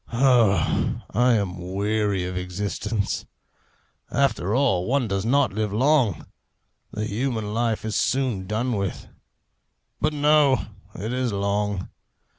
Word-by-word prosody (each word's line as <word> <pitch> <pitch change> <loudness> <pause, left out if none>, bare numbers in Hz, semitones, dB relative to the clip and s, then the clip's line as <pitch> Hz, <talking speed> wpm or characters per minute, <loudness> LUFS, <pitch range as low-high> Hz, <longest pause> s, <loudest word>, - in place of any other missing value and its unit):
Oh, 120 -5 +2
I 125 +3 +3
am 95 -5 -1
weary 100 -2 0
of 90 0 -4
existence! 100 +3 -3 0.8
After 120 -7 +1
all, 120 -10 +2
one 130 -1 +1
does 100 0 -2
not 140 -2 +3
live 105 0 -1
long! 125 - +2 0.7
The 105 0 -3
human 110 -1 -2
life 115 -1 0
is 110 - -1
soon 125 -8 0
done 115 +5 -1
with. 100 -2 -3 0.9
But 155 +1 +1
no 145 -2 +3 0.3
it 110 +6 -4
is 125 -2 0
long. 100 -1 -1
110 Hz, 120 wpm, -24 LUFS, 100-130 Hz, 0.9 s, I